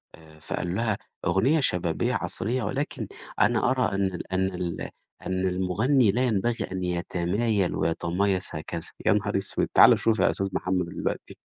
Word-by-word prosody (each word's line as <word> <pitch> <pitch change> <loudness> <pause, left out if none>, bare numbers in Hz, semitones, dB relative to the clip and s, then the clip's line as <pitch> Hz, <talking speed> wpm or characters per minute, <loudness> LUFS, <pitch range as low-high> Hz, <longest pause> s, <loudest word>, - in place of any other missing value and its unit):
آآ، 80 -1 -17
فقال 85 +3 -3
لها: 110 -1 0 0.3
"أغنية 125 - +3
شبابية 90 - 0
عصرية، 125 +5 -2
ولكن 140 +2 -3 0.3
أنا 120 +1 +3
أرى 125 -6 +1
أن 100 - +1
ال 90 0 -6
أن 95 0 +2
ال 90 -1 -4 0.4
أن 95 0 -1
المغني 100 +7 +2
لا 125 +6 +1
ينبغي 115 0 0
أن 95 -1 -3
يتمايل 90 +3 0
ويتمايص 95 +3 0
هكذا." 80 +1 -5 0.2
يا - - +5
نهار - - 0
أسوِد! - - -1
تعالَ - - +7
شوف 115 -1 +1
يا - - +4
أستاذ 100 - -1
محمد 90 -1 0
دلوقتي. - - -4
95 Hz, 155 wpm, -26 LUFS, 90-115 Hz, 0.4 s, تعالَ